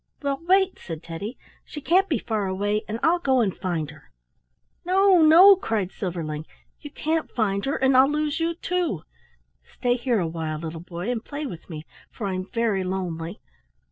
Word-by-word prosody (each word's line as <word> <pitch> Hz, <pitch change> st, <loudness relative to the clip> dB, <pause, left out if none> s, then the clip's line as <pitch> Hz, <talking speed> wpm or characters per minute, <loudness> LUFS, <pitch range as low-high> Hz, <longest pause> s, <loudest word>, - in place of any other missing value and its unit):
"Well, 280 Hz, +1 st, -1 dB
wait!" 380 Hz, 0 st, +3 dB
said 165 Hz, -2 st, -7 dB
Teddy. 200 Hz, +9 st, -6 dB, 0.3 s
"She 295 Hz, -, -8 dB
can't 365 Hz, +7 st, +2 dB
be 295 Hz, -, +2 dB
far 215 Hz, -2 st, -2 dB
away 205 Hz, +3 st, 0 dB
and 220 Hz, +2 st, -4 dB
I'll 345 Hz, +2 st, +4 dB
go 265 Hz, -6 st, +2 dB
and 205 Hz, -6 st, +1 dB
find 165 Hz, -6 st, -3 dB
her." 155 Hz, -2 st, -18 dB, 0.7 s
"No, 375 Hz, 0 st, +4 dB
no!" 345 Hz, +6 st, +9 dB
cried 220 Hz, -, -2 dB
Silverling. 160 Hz, -5 st, -4 dB, 0.3 s
"You 290 Hz, -, -9 dB
can't 315 Hz, +2 st, -2 dB
find 200 Hz, -4 st, -1 dB
her, 275 Hz, -, 0 dB
and 265 Hz, 0 st, +2 dB
I'll 260 Hz, +2 st, +6 dB
lose 300 Hz, 0 st, -1 dB
you 330 Hz, +1 st, 0 dB
too. 345 Hz, -, -2 dB, 0.7 s
Stay 245 Hz, -1 st, +1 dB
here 240 Hz, -2 st, 0 dB
awhile, 160 Hz, -2 st, -3 dB
little 165 Hz, +1 st, -6 dB
boy, 175 Hz, +5 st, -5 dB
and 230 Hz, -2 st, -3 dB
play 295 Hz, +3 st, -5 dB
with 175 Hz, -, -8 dB
me, 155 Hz, -2 st, -7 dB, 0.2 s
for 215 Hz, -, -6 dB
I'm 185 Hz, -1 st, -3 dB
very 230 Hz, -5 st, 0 dB
lonely. 180 Hz, -1 st, -4 dB
220 Hz, 175 wpm, -24 LUFS, -, 0.7 s, no